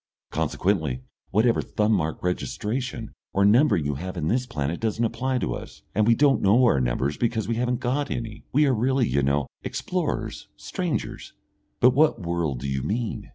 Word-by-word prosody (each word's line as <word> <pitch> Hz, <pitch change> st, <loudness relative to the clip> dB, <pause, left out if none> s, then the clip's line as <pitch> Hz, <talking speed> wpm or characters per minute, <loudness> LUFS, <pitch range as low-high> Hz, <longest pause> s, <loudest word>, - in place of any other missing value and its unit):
Consequently, 80 Hz, -10 st, 0 dB, 0.3 s
whatever 115 Hz, +4 st, +3 dB
thumb 105 Hz, +1 st, 0 dB
mark 80 Hz, -7 st, 0 dB
registration 115 Hz, +6 st, -3 dB, 0.2 s
or 100 Hz, +1 st, +3 dB
numbering 105 Hz, -, +4 dB
you 75 Hz, -, 0 dB
have 90 Hz, +6 st, -6 dB
in 80 Hz, -1 st, -1 dB
this 125 Hz, +2 st, 0 dB
planet 75 Hz, -, -2 dB
doesn't 115 Hz, +1 st, 0 dB
apply 130 Hz, +3 st, -1 dB
to -, -, -1 dB
us, -, -, -9 dB
and 105 Hz, +1 st, +2 dB
we 115 Hz, -, +6 dB
don't 140 Hz, +1 st, +3 dB
know 110 Hz, +6 st, +5 dB
our 115 Hz, -, +4 dB
numbers 65 Hz, +4 st, 0 dB
because 115 Hz, -3 st, 0 dB
we 115 Hz, -, 0 dB
haven't 125 Hz, 0 st, 0 dB
got 135 Hz, +4 st, 0 dB
any. 115 Hz, -2 st, -5 dB
We 150 Hz, +3 st, +4 dB
are 135 Hz, -, +3 dB
really, 125 Hz, +1 st, +2 dB
you 70 Hz, -, +1 dB
know, 70 Hz, +1 st, +1 dB, 0.2 s
explorers, -, -, -3 dB
strangers -, -, -4 dB, 0.2 s
" -, -, -46 dB
"But 125 Hz, -, +7 dB
what 155 Hz, +3 st, +3 dB
world 85 Hz, -7 st, -2 dB
do 70 Hz, -, -3 dB
you 65 Hz, 0 st, -1 dB
mean?" 110 Hz, -, -3 dB
110 Hz, 185 wpm, -25 LUFS, 80-125 Hz, 0.3 s, But